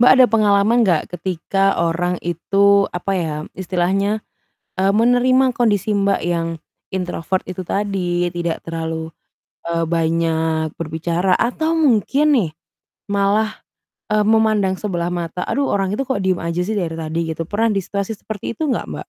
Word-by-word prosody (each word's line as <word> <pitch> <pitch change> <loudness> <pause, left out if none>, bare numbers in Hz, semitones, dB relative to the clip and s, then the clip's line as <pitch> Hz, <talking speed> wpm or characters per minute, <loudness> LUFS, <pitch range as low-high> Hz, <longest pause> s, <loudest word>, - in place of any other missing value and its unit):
Mbak, 245 - +7
ada 255 - +9
pengalaman 215 +1 +3
nggak 170 -4 +1
ketika 195 +2 0
orang 170 +1 0
itu, 200 +4 +3
apa 180 +2 -2
ya? 160 -4 -2 0.2
Istilahnya, 190 +3 0 0.6
eee, 195 +1 +3
menerima 245 +3 +4
kondisi, 215 -3 +1
Mbak, 200 0 +1
yang, 170 -1 0 0.5
introvert 185 0 -2
itu 185 0 -5
tadi. 180 -3 -1
Tidak 170 -1 -2
terlalu, 160 -1 -4 0.6
eee, 165 0 0
banyak 160 -1 0
berbicara. 170 +3 -1
Atau 315 +7 0
mungkin 275 0 +3
nih 180 -9 +1 0.6
malah, 205 +2 +1 0.5
eee, 215 - +3
memandang 215 -3 +3
sebelah 175 -4 -2
mata, 175 0 -4
"Aduh, 280 0 0
orang 195 -1 0
itu 270 -1 -2
kok 205 -7 -1
diem 185 -2 +1
aja 170 +1 -1
sih 215 - -2
dari 170 -5 -2
tadi." 160 +1 -2
Gitu. 165 - -4
Pernah 225 +2 +1
di 195 - +2
situasi 200 +2 -3
seperti 205 +1 -6
itu 315 - -2
nggak, 255 - 0
Mbak? - - -5
190 Hz, 150 wpm, -19 LUFS, 170-210 Hz, 0.6 s, ada